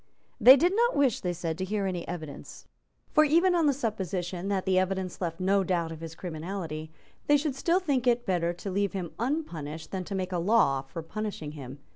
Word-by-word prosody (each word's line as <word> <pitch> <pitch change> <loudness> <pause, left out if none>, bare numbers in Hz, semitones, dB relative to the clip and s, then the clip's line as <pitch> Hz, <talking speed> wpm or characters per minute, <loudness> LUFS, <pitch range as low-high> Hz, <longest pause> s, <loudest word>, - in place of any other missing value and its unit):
They 260 +3 +10
did 355 +7 +2
not 475 +2 +3
wish, 270 -6 +3
they 180 - -2
said, 165 -1 -4
to - - -1
hear 200 +1 -1
any 180 -3 -3
evidence. 160 -4 -8 0.5
For, 305 - +6
even 335 +5 +4
on 335 -3 +3
the - - +5
supposition 190 - -3
that 195 -2 -1
the 185 -1 +3
evidence 185 -1 -2
left 165 -2 -3
no 195 +1 +2
doubt 170 -3 -1
of 160 - -7
his 165 0 -7
criminality, 160 -2 -5 0.4
they 290 - +6
should 290 -1 -1
still 335 +7 +2
think 275 -9 0
it 240 0 +2
better 175 -2 +1
to 180 +3 -6
leave 200 +1 0
him 180 -4 -4
unpunished 165 - -3
than 190 -1 -3
to 200 - -5
make 185 -1 -2
a 175 - 0
law 170 -8 +3
for 140 +5 -8
punishing 205 -4 -5
him. 140 -3 -9
190 Hz, 210 wpm, -28 LUFS, 170-240 Hz, 0.5 s, They